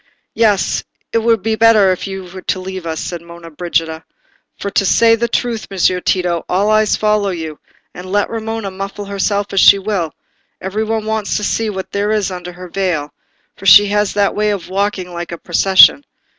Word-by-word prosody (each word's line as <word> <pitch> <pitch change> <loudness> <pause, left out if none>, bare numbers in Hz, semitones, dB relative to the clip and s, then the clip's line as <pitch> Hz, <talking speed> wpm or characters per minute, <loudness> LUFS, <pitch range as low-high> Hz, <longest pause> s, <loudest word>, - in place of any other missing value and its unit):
"Yes, 210 -7 +1 0.3
it 230 - +3
were 230 0 +2
better 220 -2 +3
you 190 -1 -6
should 185 +2 -4
leave 185 -1 -7
us," 160 -1 -3
said 175 0 -5
Monna 170 0 -12
Brigida; 160 0 -2 0.5
"for 200 - -5
to 200 - +2
say 225 +4 +4
the 235 +1 -1
truth, 235 -1 -2
Messer 185 -1 +1
Tito, 175 -3 0
all 200 +4 +1
eyes 215 -1 +3
follow 210 -1 +1
you, 160 -4 -6 0.3
and 185 +1 -9
let 205 0 +1
Romola 225 -2 -4
muffle 195 +2 -6
herself 200 0 -2
as 195 - +2
she 200 - +7
will, 195 -5 -2 0.5
every 200 +3 -3
one 220 0 -2
wants 220 -1 -1
to 210 - -4
see 225 +2 -1
what 190 -2 -6
there 205 +1 -1
is 210 -3 0
under 180 -1 -7
her 180 +1 -10
veil, 175 -6 -2 0.4
for 195 - -6
she 205 +3 +9
has 205 0 0
that 205 -1 +2
way 210 0 0
of 200 -4 -3
walking 190 -2 -2
like 175 0 -6
a 170 - -5
procession. 190 +10 +5
195 Hz, 185 wpm, -16 LUFS, 180-210 Hz, 0.5 s, she